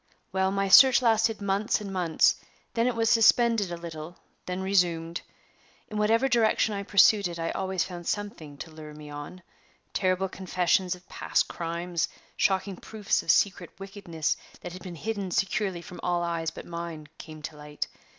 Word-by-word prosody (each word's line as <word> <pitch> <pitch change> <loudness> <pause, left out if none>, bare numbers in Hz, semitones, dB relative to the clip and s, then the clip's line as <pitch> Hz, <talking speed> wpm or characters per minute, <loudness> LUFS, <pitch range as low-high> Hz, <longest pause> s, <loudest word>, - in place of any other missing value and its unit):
"Well, 190 0 +1
my 195 0 0
search 260 +6 +8
lasted 225 -2 +2
months 200 +5 +1
and 200 -2 -6
months; 175 -4 +3 0.3
then 230 +1 +2
it 250 - 0
was 225 0 +1
suspended 225 -3 +4
a 170 - -4
little; 170 0 -8 0.3
then 180 +1 -3
resumed. 170 -3 +1 0.7
In 215 -1 -3
whatever 225 +5 +3
direction 225 -3 +2
I 200 - -3
pursued 200 0 +5
it 170 -1 -6
I 165 0 -2
always 190 -1 -1
found 175 -2 -8
something 175 -8 -4
to 160 - -8
lure 155 -1 -10
me 150 -1 -10
on. 145 +5 -8 0.5
Terrible 185 0 +1
confessions 185 0 0
of 180 0 -19
past - - 0
crimes, 170 0 -2 0.3
shocking 190 -1 +1
proofs 215 -2 -1
of - - -12
secret 180 +1 +3
wickedness 195 -5 -3 0.2
that 175 - -7
had 185 - -9
been 175 -1 -8
hidden 200 +2 -3
securely 190 -1 -1
from 180 - -10
all 175 -1 0
eyes 165 -1 -1
but - - -10
mine, 170 -3 -6
came 155 -2 -10
to 155 - -6
light. 150 0 -5
185 Hz, 170 wpm, -27 LUFS, 170-205 Hz, 0.7 s, search